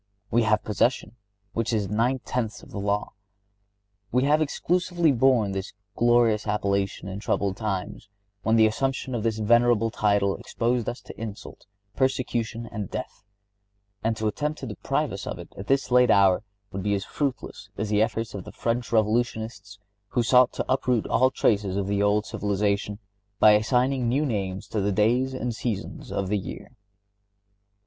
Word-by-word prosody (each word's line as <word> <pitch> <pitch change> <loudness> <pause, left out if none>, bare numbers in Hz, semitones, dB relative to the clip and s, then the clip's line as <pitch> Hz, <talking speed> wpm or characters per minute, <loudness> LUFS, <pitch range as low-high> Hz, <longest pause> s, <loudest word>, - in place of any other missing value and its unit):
We 120 - +4
have 110 -1 +2
possession, 110 +1 0 0.4
which 115 +1 -1
is 105 -3 0
nine 120 +6 0
tenths 110 -4 -3
of - - -14
the 100 - -5
law. 100 +1 -1 1.0
We 125 +2 +2
have 150 +3 +3
exclusively 175 +2 +1
borne 120 -5 +3
this 95 0 -4 0.2
glorious 120 -3 +3
appellation 100 -2 -1
in 95 +1 -5
troubled 100 -2 -1
times, 100 -2 -4 0.3
when 110 +3 +2
the 110 -1 +6
assumption 130 +4 -1
of 120 - -1
this 110 0 0
venerable 115 0 +3
title 100 -2 +1
exposed 120 0 -1
us 120 - -7
to - - -11
insult, 105 -2 -8 0.3
persecution 120 -3 -1
and 105 -4 -5
death; - - -6 0.8
and 110 0 0
to 110 - -3
attempt 150 +8 -2
to - - -4
deprive - - -2
us - - -6
of - - -4
it - - -11
at 95 - -8
this 135 -1 +1
late 125 0 +5
hour, 95 -3 +5 0.3
would 95 - -4
be 100 +2 +1
as 95 -1 -3
fruitless 140 -5 -4
as 105 0 -2
the 105 0 +3
efforts 115 0 -1
of 100 - -6
the - - -10
French 120 +1 -2
Revolutionists 110 -2 0 0.3
who 120 - 0
sought 125 +1 +5
to - - -3
uproot 125 -3 +1
all 130 +1 +3
traces 100 -6 +1
of 100 - 0
the 100 +1 0
old 105 +1 +2
civilization 100 0 -1 0.4
by 105 - +7
assigning 125 +3 +2
new 140 +5 +1
names 95 -7 -3
to 105 - -1
the 100 +1 +1
days 120 +6 +2
and 125 -2 -2
seasons 110 -4 -4
of 95 - -2
the 105 0 +1
year. 95 - -8
110 Hz, 170 wpm, -25 LUFS, 100-125 Hz, 1.0 s, by